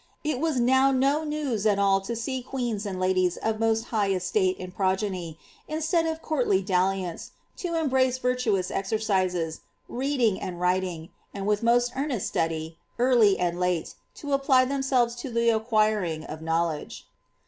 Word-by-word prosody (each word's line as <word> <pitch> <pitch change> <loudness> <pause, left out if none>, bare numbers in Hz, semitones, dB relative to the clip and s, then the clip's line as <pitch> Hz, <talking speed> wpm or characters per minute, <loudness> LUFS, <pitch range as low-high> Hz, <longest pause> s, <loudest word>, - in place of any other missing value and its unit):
It 300 -4 -1
was 315 -4 0
now 260 +3 +4
no 275 +4 +2
news 290 -9 -1
at 205 -2 +3
all 195 -1 +3
to 215 +5 -4
see 255 +3 -3
queens 240 -5 -3
and 190 -2 -4
ladies 185 -1 +1
of 220 -1 -2
most 225 0 +1
bjgh 205 -4 +1
estate 185 +1 0
and 180 0 -8
progeny, 190 -4 -1 0.3
instead 325 +2 0
of 320 0 -4
courtly 245 -11 +1
dalliance, 185 -1 -1 0.2
to 345 -2 -3
embrace 260 -5 +2
vir 250 0 +1
toous 210 -7 0
exercises, 190 -5 -1 0.3
reading 250 -5 0
and 175 -2 -5
writing, 180 -2 -1 0.3
and 195 -1 -4
with 210 0 +1
most 240 +1 +3
earnest 270 -6 -2
study, 160 0 -2 0.2
early 235 -5 +4
and 175 -1 -1
late, 180 -2 -1 0.2
to 285 -1 -4
apply 270 -2 +4
themselves 265 -3 +1
to 250 +2 -5
the 235 0 +2
acquiring 215 -7 +1
of 155 0 -8
knowledge." 165 -1 -2
215 Hz, 160 wpm, -26 LUFS, 185-260 Hz, 0.3 s, now